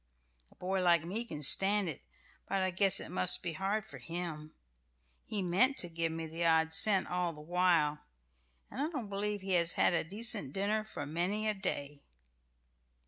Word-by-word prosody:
A - - -22
boy 190 +1 -2
like 170 -3 +3
me 205 +7 -4
can 150 -9 -6
stand 195 +6 +5
it, 155 - -6 0.5
but 195 -1 0
I 185 - -1
guess 190 0 +1
it - - -8
must 90 0 +3
be 175 -2 -4
hard 195 +5 -2
for 130 - -11
him. 155 +2 -6 0.7
He 205 -3 -2
meant 200 +11 +2
to 175 - -1
give 165 0 -2
me 165 0 -5
the 165 +2 -5
odd 160 -1 +2
cent 195 +2 +5
all 180 -1 -2
the 150 - -13
while; 165 -3 +1 0.7
and 265 - -5
I 300 - -1
don't 260 -11 -6
believe 205 0 -3
he 190 0 -5
has 170 -1 +2
had - - +2
a 175 - 0
decent 190 - 0
dinner 210 +2 -1
for 215 - -7
many 180 +8 -2
a 215 - +1
day." 145 -7 -5
180 Hz, 190 wpm, -32 LUFS, 160-200 Hz, 0.7 s, stand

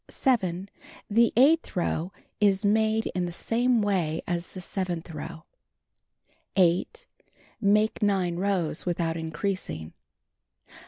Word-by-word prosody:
7. 190 -8 0 0.4
The 230 +2 +4
eighth 300 +4 +4
row 175 -1 -1 0.3
is 205 -1 +3
made 220 +1 +2
in 180 0 -1
the - - -5
same 235 +5 +1
way 175 -6 0
as 175 0 -3
the - - -5
seventh 180 -2 -3
row. 160 +1 -7 1.1
8. 180 - +2 0.6
Make 210 +2 +2
9 190 -4 +1
rows 180 -4 -1
without 170 -2 -1
increasing. 160 - -4
185 Hz, 110 wpm, -27 LUFS, 170-210 Hz, 1.1 s, The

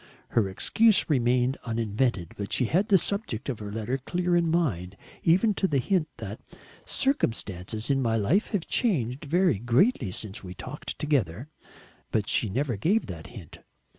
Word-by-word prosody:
Her 105 -4 +2
excuse 220 - +3
remained 125 0 +2
uninvented, 110 -5 -1
but 100 -1 -5
she 125 - +2
had 185 - +1
the 195 - +6
subject 170 - -2
of 125 - -3
her 105 -1 -6
letter 115 +5 -2
clear 175 +5 0
in 170 -1 +3
her - - 0
mind, 100 - -1 0.2
even 190 +6 +3
to 190 - 0
the 145 - +1
hint 165 +4 +1
that - - -7 0.5
"circumstances 110 - -1
in 135 -1 +2
my 115 -2 +1
life 145 - +2
have 200 -7 -2
changed 145 - 0
very 170 - +2
greatly 120 - +2
since 100 +3 -4
we 90 -1 -8
talked 145 +10 -7
together." 130 - -1 0.6
But 105 -2 0
she 110 - +2
never 125 +1 -1
gave 195 - +2
that 80 -5 -8
hint. 100 -10 -11
125 Hz, 165 wpm, -27 LUFS, 105-170 Hz, 0.6 s, the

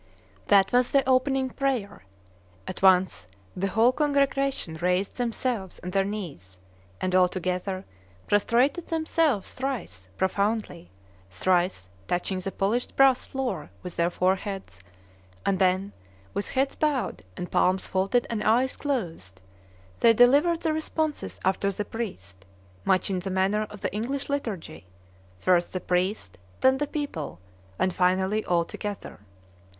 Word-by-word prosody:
That 195 +2 +5
was 245 0 +4
the 275 -2 +3
opening 260 0 +2
prayer. 250 - -2 0.6
At 185 - -6
once 185 - +4 0.3
the 195 +2 -1
whole 225 +5 +4
congregation 275 - 0
raised 180 +4 0
themselves 235 -5 -2
on 180 - -4
their 195 +1 +2
knees 165 - -6 0.4
and, 185 - -1
all 185 -1 +5
together, 185 +1 -3 0.4
prostrated 245 - +2
themselves 315 - 0
thrice 225 - -5
profoundly, 200 - -1 0.4
thrice 175 - +1 0.2
touching 180 +2 -1
the 195 +1 -4
polished 215 +7 -1
brass 270 -2 +4
floor 265 -2 -3
with 180 -1 -7
their 170 0 +2
foreheads; 190 - -2 0.7
and 190 -1 +1
then, 190 +1 +2 0.4
with 200 - -2
heads 270 +1 +1
bowed 295 -5 0 0.2
and 180 - -5
palms 185 +1 +2
folded 195 +6 +1
and 220 -2 -2
eyes 245 +4 +3
closed, 165 - -3 0.6
they 230 - +6
delivered 290 +8 +5
the 320 -2 +1
responses 315 -1 -2
after 190 +1 +1
the 205 +2 -4
priest, 95 - -6 0.4
much 190 +1 +2
in 185 - 0
the 190 +2 -5
manner 195 +3 +1
of 210 - -11
the - - -2
English 265 +7 -3
liturgy, 200 - -4 0.5
first 175 - +2
the 185 - -1
priest, 180 - -1 0.2
then 265 0 +4
the 295 - 0
people, 280 - -4 0.4
and 185 - +1
finally 190 +4 +2
all 170 -1 +2
together. 205 +3 -6
200 Hz, 135 wpm, -26 LUFS, 180-255 Hz, 0.7 s, they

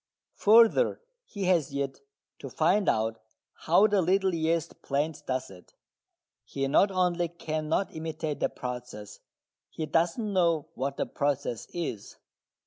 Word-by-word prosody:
Further, 230 - +5 0.3
he 200 - -6
has 170 -7 +1
yet 140 -1 -3 0.4
to 135 - -7
find 180 - +2
out 110 0 0 0.3
how 175 +6 +3
the 205 -2 +3
little 190 +2 +2
yeast 165 -1 -1
plant 145 +3 -2
does 130 -5 -2
it. 90 -2 -16 0.7
He 135 0 -3
not 170 +8 +4
only 180 -2 +1
cannot 160 +1 -2
imitate 160 -1 -4
the - - +1
process, 125 -5 -7 0.5
he 160 - -4
does 165 +3 +1
not 230 - -2
know 170 -5 +1
what 135 +2 -3
the - - 0
process 140 -5 -2
is. 160 - -5
160 Hz, 135 wpm, -28 LUFS, 135-180 Hz, 0.7 s, Further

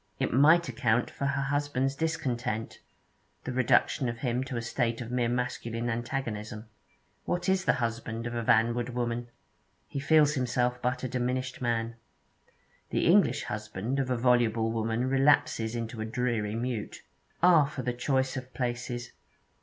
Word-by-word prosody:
It - - -1
might 155 +7 +5
account 120 -1 +1
for 140 - -2
her 140 0 0
husband's 140 -1 0
discontent 125 -8 -2 0.6
the - - -4
reduction 130 +1 +2
of 115 - -4
him 125 0 -1
to 130 -2 -4
a - - -1
state 120 -1 -1
of 120 -1 -6
mere 125 -1 +1
masculine 120 -1 -2
antagonism. 115 -2 -4 0.6
What 175 0 -1
is 190 0 +2
the - - +4
husband 115 -1 -3
of 120 - -3
a 120 - -1
vanward 120 +1 +2
woman? 120 0 -2 0.6
He 140 - -4
feels 150 +1 +4
himself 125 -2 0
but 125 +1 -1
a - - 0
diminished 125 +1 -2
man. 115 -1 -1 0.9
The - - 0
English - - +4
husband 105 +5 -3
of 130 -2 -1
a 125 - +1
voluble 115 -2 +2
woman 115 +2 -1
relapses 135 -4 +2
into 115 -1 -4
a - - -2
dreary 110 -3 -1
mute. 120 -2 -4 0.4
Ah, 170 -5 +7
for 140 -2 -5
the 125 +1 -1
choice 130 +1 0
of 130 0 -7
places! 120 -1 -3
125 Hz, 155 wpm, -29 LUFS, 115-130 Hz, 0.9 s, Ah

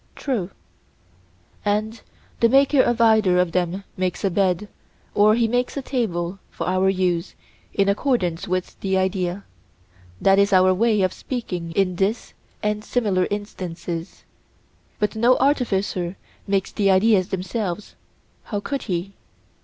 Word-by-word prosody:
True. 230 -10 -2 1.1
And 215 +2 -1 0.4
the 230 - +4
maker 275 +2 +5
of 240 -2 +1
either 220 -5 +4
of 180 -1 +2
them 180 +2 -1
makes 185 -1 -2
a 195 - +1
bed 190 +2 +1 0.5
or 210 +1 +5
he 230 -1 +2
makes 245 +4 -1
a 275 - -3
table 195 -8 -2
for - - -5
our 185 +1 +2
use, 180 -3 0 0.4
in 200 - +1
accordance 200 - 0
with 185 0 -3
the 190 -1 0
idea—that 95 - -2
is 200 +1 +3
our 185 0 +5
way 215 0 +2
of 185 - +1
speaking 180 -10 -5
in 185 -1 +1
this 200 +5 -1 0.3
and 210 0 -1
similar 205 -7 +1
instances—but 180 +1 -6
no 240 +3 +4
artificer 200 -9 0 0.3
makes 195 -1 0
the 200 -2 +1
ideas 190 -1 +4
themselves: 190 +1 -4 0.5
how 205 - -3
could 275 +6 -3
he? 180 +2 -2
195 Hz, 130 wpm, -22 LUFS, 180-220 Hz, 1.1 s, maker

